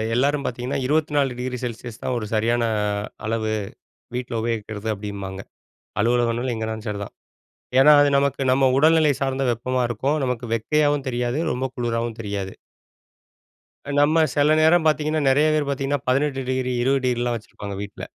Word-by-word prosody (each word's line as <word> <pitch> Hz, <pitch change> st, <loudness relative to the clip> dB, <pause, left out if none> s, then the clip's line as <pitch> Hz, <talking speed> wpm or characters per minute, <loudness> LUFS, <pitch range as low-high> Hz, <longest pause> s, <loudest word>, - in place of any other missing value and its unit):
எல்லாரும் 140 Hz, +2 st, +1 dB
பார்த்தீங்கன்னா, 125 Hz, +3 st, -3 dB
24 145 Hz, -4 st, +1 dB
degree 125 Hz, -1 st, -3 dB
Celsius 115 Hz, -1 st, -7 dB
தான் 125 Hz, -, -1 dB
ஒரு 110 Hz, -, -5 dB
சரியான 115 Hz, +2 st, +1 dB, 0.6 s
அளவு 110 Hz, -1 st, -1 dB, 0.6 s
வீட்ல 125 Hz, -1 st, -4 dB
உபயோகிக்கிறது 110 Hz, -1 st, -3 dB
அப்படீம்பாங்க. 100 Hz, -1 st, -6 dB, 0.6 s
அலுவலகங்கள் 120 Hz, +2 st, +1 dB
எங்கனாலும் 110 Hz, 0 st, -4 dB
சரி 105 Hz, -1 st, -3 dB
தான். -, -, -13 dB, 0.7 s
ஏன்னா 150 Hz, +3 st, +8 dB
அது 145 Hz, -, +4 dB
நமக்கு 140 Hz, -1 st, 0 dB
நம்ம 135 Hz, +1 st, +3 dB
உடல்நிலை 155 Hz, -1 st, +5 dB
சார்ந்த 135 Hz, 0 st, 0 dB
வெப்பமா 125 Hz, +2 st, -1 dB
இருக்கும். 135 Hz, +6 st, 0 dB
நமக்கு 125 Hz, -1 st, -2 dB
வெக்கையாவும் 145 Hz, +4 st, +1 dB
தெரியாது. 120 Hz, +2 st, -1 dB
ரொம்ப 125 Hz, +2 st, -2 dB
குளிராவும் 115 Hz, -1 st, -2 dB
தெரியாது. 100 Hz, -3 st, -4 dB, 1.5 s
நம்ம 155 Hz, +3 st, +4 dB
சில 145 Hz, +1 st, +4 dB
நேரம் 160 Hz, +1 st, +4 dB
பார்த்தீங்கன்னா, 155 Hz, 0 st, +1 dB
நெறைய 145 Hz, +3 st, +4 dB
பேர் 150 Hz, -2 st, 0 dB
பார்த்தீங்கன்னா, 140 Hz, 0 st, -1 dB
18 135 Hz, +1 st, +1 dB
டிகிரி, 130 Hz, -1 st, -1 dB
20 135 Hz, +1 st, +1 dB
டிகிரிலாம் 120 Hz, -1 st, 0 dB
வச்சிருப்பாங்க 100 Hz, -2 st, -8 dB
வீட்ல. 100 Hz, 0 st, -8 dB
125 Hz, 140 wpm, -23 LUFS, 115-140 Hz, 1.5 s, ஏன்னா